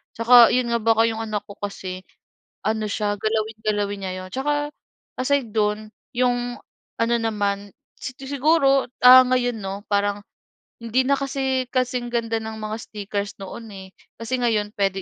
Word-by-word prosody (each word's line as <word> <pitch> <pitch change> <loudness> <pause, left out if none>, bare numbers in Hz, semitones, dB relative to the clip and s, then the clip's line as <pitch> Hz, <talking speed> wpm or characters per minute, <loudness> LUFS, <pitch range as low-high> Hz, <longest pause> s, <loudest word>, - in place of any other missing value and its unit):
Tsaka 235 +1 +7
'yon 250 -1 +1
nga 235 - +3
baka 225 +1 +4
'yong 225 - -4
anak 215 -2 -3
ko 200 - -9
kasi 185 -2 -6 0.6
ano 220 0 0
siya 205 0 -1
galawin, 220 +1 -1
galawin 205 -1 0
niya 185 - -3
'yon. 185 - -10
Tsaka 290 +2 -1 0.5
aside 260 -2 +1
do'n 215 0 0 0.3
'yong 245 -1 0 0.4
ano 230 +1 +2
naman 205 -3 -2 0.3
sig 255 - -7
siguro 275 0 +3 0.2
ah 255 +1 +10
ngayon 245 -2 +1
'no 195 0 -5
parang 205 0 +1 0.6
hindi 230 +2 +1
na 280 0 +3
kasi 265 -1 -1
kasing 250 -1 0
ganda 230 -1 0
ng 220 0 -6
mga 215 0 -4
stickers 205 -2 -5
noon, 225 +4 -8
eh. 190 -1 -10 0.3
Kasi 230 +3 -2
ngayon 215 -3 0
puwede 195 -1 0
225 Hz, 155 wpm, -23 LUFS, 205-250 Hz, 0.6 s, ah